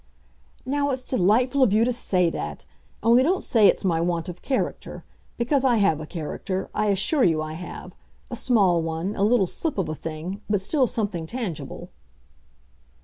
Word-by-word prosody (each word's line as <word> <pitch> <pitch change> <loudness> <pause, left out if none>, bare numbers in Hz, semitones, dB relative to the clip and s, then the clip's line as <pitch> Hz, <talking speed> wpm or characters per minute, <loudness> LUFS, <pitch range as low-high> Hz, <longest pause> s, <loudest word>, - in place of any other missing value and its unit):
"Now 285 +2 0
it's 260 -1 -2
delightful 250 +5 +2
of 250 -6 +5
you 220 +2 +4
to 250 - +1
say 180 -7 +2
that! 75 - -6 0.4
Only 235 +3 +5
don't 360 +8 +1
say 220 -5 +4
it's - - +2
my 165 -3 +1
want 170 -1 -1
of 180 0 -9
character. 265 - -3 0.3
Because 255 +3 +1
I 250 -3 +3
have 195 -7 +2
a 155 - -7
character—I 185 +6 -3
assure 205 - +2
you 165 -3 +3
I 155 0 -4
have; 180 +2 -8 0.4
a - - -3
small 200 -9 +3
one, 165 +5 -3
a - - -3
little 210 -1 +4
slip 310 - -3
of 190 - 0
a - - -2
thing, 165 +5 -6
but 205 -1 +2
still 260 +7 +1
something 200 -8 -2
tangible." 215 - -6
200 Hz, 175 wpm, -24 LUFS, 170-245 Hz, 0.4 s, of